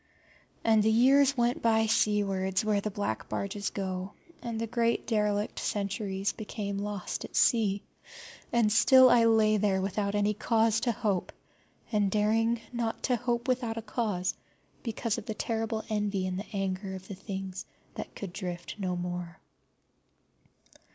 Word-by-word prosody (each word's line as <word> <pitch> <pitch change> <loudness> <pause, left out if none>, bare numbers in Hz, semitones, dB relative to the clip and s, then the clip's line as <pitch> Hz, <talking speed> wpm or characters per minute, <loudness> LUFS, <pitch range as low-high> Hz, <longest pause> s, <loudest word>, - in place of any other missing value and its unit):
And 220 -1 +4
the 215 - +3
years 270 +4 +5
went 240 0 +1
by 220 -1 +3
seawards 200 -3 +1
where 210 -2 +2
the 215 - -2
black 195 - -3
barges 200 0 -2
go, 190 0 -4 0.3
and 230 -2 -4
the 230 - -1
great 230 0 0
derelict 210 -2 0
centuries 200 -1 -2
became 205 -2 -4
lost 205 -2 -4
at - - -9
sea, 205 -4 +3 0.7
and 230 -3 +3
still 255 +3 +7
I 235 -1 +6
lay 220 -1 +4
there 195 -2 +2
without 200 +1 -1
any 205 0 +2
cause 225 +1 +2
to 240 +1 +1
hope, 205 -5 -1 0.6
and 210 -3 +2
daring 225 +3 +2
not 235 -2 -2
to 250 - +2
hope 240 +1 -2
without 245 -3 0
a 225 - -4
cause, 210 -5 -1 0.5
because 230 -1 -2
of 215 - -12
the 220 - -3
terrible 225 0 -2
envy 205 -3 -1
and 185 0 -2
the 205 - -8
anger 195 -1 -3
of 190 0 -10
the - - -6
things 190 -1 -6 0.3
that - - -7
could 195 -4 -6
drift 175 -3 -5
no 185 -2 -1
more. 175 -1 -4
210 Hz, 155 wpm, -29 LUFS, 195-225 Hz, 0.7 s, still